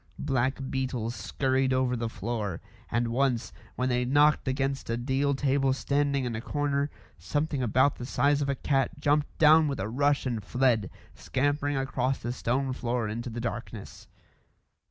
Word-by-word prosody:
Black 135 -2 0
beetles 125 -3 -2
scurried 130 +3 0
over 130 -1 +1
the 115 -1 -2
floor, 105 -3 -3 0.3
and 120 0 0
once, 125 -1 0 0.2
when 125 - 0
they 125 0 +1
knocked 145 +3 +3
against 135 0 -1
a 115 - 0
deal 135 +3 0
table 135 -1 +2
standing 140 0 0
in 120 -2 -3
a 110 - -4
corner, 145 +1 -1 0.3
something 145 -2 -1
about 130 +4 +2
the 120 - -6
size 145 +1 +2
of 140 - -1
a 140 - +1
cat 135 +3 0
jumped 145 0 +1
down 155 0 +6
with 140 - -3
a 95 - -2
rush 140 +5 +1
and 115 -5 -2
fled, 125 -6 +1 0.2
scampering 145 +1 -1
across 135 -1 0
the 120 +1 -4
stone 130 +2 -1
floor 120 -2 -2
into 115 +3 -4
the 115 +1 -5
darkness. 115 -3 -6
130 Hz, 165 wpm, -28 LUFS, 120-140 Hz, 0.3 s, down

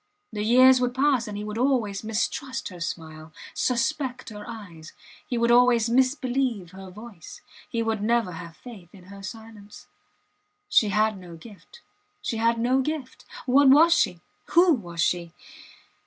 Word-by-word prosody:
The 210 - -3
years 255 +3 +6
would 250 0 -1
pass 265 -3 +2
and 205 -1 -6
he 205 - -5
would 210 +1 -5
always 240 -7 0
mistrust 230 +4 -3
her 180 -2 -11
smile, 160 -2 -7 0.2
suspect 260 +1 -2
her 210 -1 -9
eyes; 180 -8 -10 0.3
he 245 - -2
would 235 0 +2
always 240 -2 +4
misbelieve 255 - 0
her 190 0 -11
voice, 210 -2 -12 0.3
he 230 -1 -2
would 225 -2 -2
never 230 -2 +1
have 165 -1 -10
faith 210 -9 -12
in 185 - -15
her 200 - -11
silence. 215 -1 -11 0.8
She 225 - +3
had 215 0 +1
no 175 -2 -11
gift 210 - -15 0.4
she 230 - -4
had 230 +1 +1
no 250 +3 +2
gift! 280 -2 -5 0.2
What 270 +2 +5
was 320 +5 +7
she? - - +1 0.3
Who 345 0 +6
was 175 - -4
she? 170 -1 -1
225 Hz, 155 wpm, -25 LUFS, 195-255 Hz, 0.8 s, was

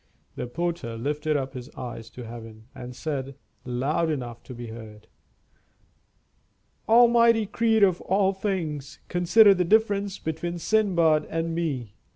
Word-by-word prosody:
The - - -4
porter 170 -5 -3
lifted 150 +4 -1
up 135 -1 -4
his 125 -2 -8
eyes 120 -2 -7
to 125 - -10
heaven, 115 -1 -10
and 125 0 -9
said, 135 -2 -4 0.3
loud 135 +7 0
enough 120 -6 -4
to 125 - -9
be 120 0 -7
heard, 110 -2 -11 1.8
"Almighty 235 -1 +5
Creator 220 0 +3
of 180 - -6
all 195 +1 +2
things, 165 -8 -3
consider 190 +4 +6
the 180 -1 +1
difference 205 0 +2
between 170 +2 -4
Sindbad 170 -6 +2
and 165 0 -2
me! 140 -11 -3
160 Hz, 135 wpm, -25 LUFS, 125-195 Hz, 1.8 s, consider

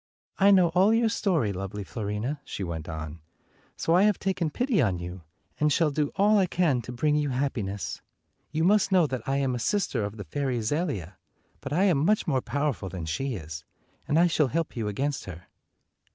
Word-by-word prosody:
"I 200 +1 +6
know 185 -4 +6
all 190 +6 +4
your 230 0 +3
story, 170 - 0
lovely 95 +2 -5
Fiorina," 110 +7 -3
she 100 - -5
went 85 -2 -5
on, 80 0 -6 0.6
"so 165 - +1
I 180 - +5
have 210 -1 +4
taken 185 -4 -1
pity 245 - +1
on 95 -8 +1
you, 90 +1 -7 0.4
and 150 0 +3
shall 155 +1 +2
do 145 0 -1
all 210 +1 +4
I 190 - +3
can 165 -8 +1
to 120 - -8
bring 150 +5 +1
you 150 -1 +1
happiness. 120 -7 -3 0.5
You 160 +1 -1
must 200 +2 +3
know 185 -3 +5
that 130 -5 -3
I 135 - +1
am 135 -2 0
a 125 - -2
sister 155 - 0
of 100 +2 -5
the 105 - -6
fairy 130 +1 -2
Zelia, 110 - -2 0.4
but 140 - -7
I 175 +6 +2
am 180 -8 +3
much 210 +6 +2
more 135 -7 +1
powerful 140 -10 -2
than 85 -2 -6
she 120 +12 -2
is, 80 -3 -7 0.4
and 150 - +2
I 170 - +6
shall 160 -4 +2
help 165 +5 -2
you 115 -3 -2
against 135 +7 -2
her." 90 -2 -9
140 Hz, 205 wpm, -27 LUFS, 105-170 Hz, 0.6 s, I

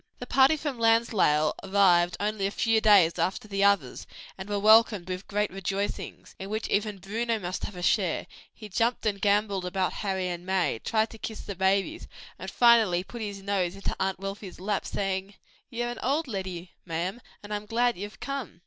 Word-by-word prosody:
The - - -7
party 270 +4 +4
from 290 -5 -4
Lansdale 225 -10 +3
arrived 180 -3 +3
only 205 -1 -1
a - - -1
few 225 +1 +1
days 195 -6 +5
after 190 +3 -1
the 200 -1 -1
others, 200 -11 +1 0.3
and 190 +1 -8
were 205 - 0
welcomed 215 -2 +5
with 185 +1 -5
great 210 0 -1
rejoicings, 195 +2 -4
in 195 - -6
which 215 +1 -2
even 210 0 0
Bruno 225 +5 -2
must 185 -3 -4
have 205 - -8
a 180 - -7
share: 185 -3 +1 0.3
he 215 - -11
jumped 230 +4 0
and 200 -2 -1
gamboled 200 -2 +1
about 185 +1 -1
Harry 190 -3 -2
and 175 0 -5
May, 185 -10 0
tried 220 - 0
to 225 - -12
kiss 220 0 -6
the 200 - -6
babies, 195 - 0 0.3
and - - -6
finally 225 -7 +4
put 235 +4 -9
his 200 -2 -5
nose 195 -3 -1
into 195 - -4
Aunt 190 0 0
Wealthy's 195 -1 -7
lap, 200 +1 -2
saying, 195 0 -3 0.3
"Ye're 240 0 -3
a - - -3
dear - - -10
auld 290 +4 0
leddy, 185 -5 -5
ma'am, 180 +7 -3 0.2
and 205 +1 -6
I'm 210 0 -4
glad 240 +2 +1
ye've 205 +3 -8
come!" 275 -10 -5
200 Hz, 195 wpm, -27 LUFS, 190-220 Hz, 0.3 s, days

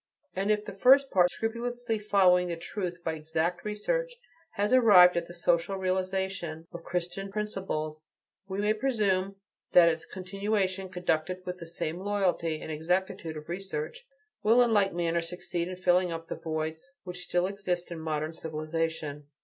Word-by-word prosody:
And 195 +2 -1
if 210 0 +2
the 200 - -6
first 265 +7 +5
part, 180 -2 +5
scrupulously 235 +1 -2
following 185 -4 +4
the 170 - -2
truth 175 0 -5
by 160 - -1
exact 160 +3 -2
research, - - -1 0.4
has 205 +4 0
arrived 200 -8 +8
at 170 -1 -1
the 175 - -9
social 170 +2 +1
realization 185 -3 -2
of 170 - -7
Christian 180 +3 -3
principles, 155 -7 -3 0.4
we 190 -1 -4
may 210 +1 +2
presume 205 -6 0 0.4
that 170 -1 +8
its 160 0 -3
continuation, 195 0 -2
conducted 180 0 -1
with 180 0 -5
the 170 - -8
same 165 0 -4
loyalty 185 -5 0
and 160 - -6
exactitude 175 +1 -1
of 150 - -9
research, 175 - -5 0.4
will 230 +3 +6
in 235 -2 +2
like 200 -2 +4
manner 170 -1 0
succeed 170 0 -3
in 185 - -5
filling 180 -1 +2
up 165 0 -6
the - - -3
voids 160 - -4
which 180 -1 -6
still 175 0 +1
exist 185 -3 -3
in 170 - -5
modern 155 0 -2
civilization. 155 -2 -3
180 Hz, 160 wpm, -29 LUFS, 165-200 Hz, 0.4 s, arrived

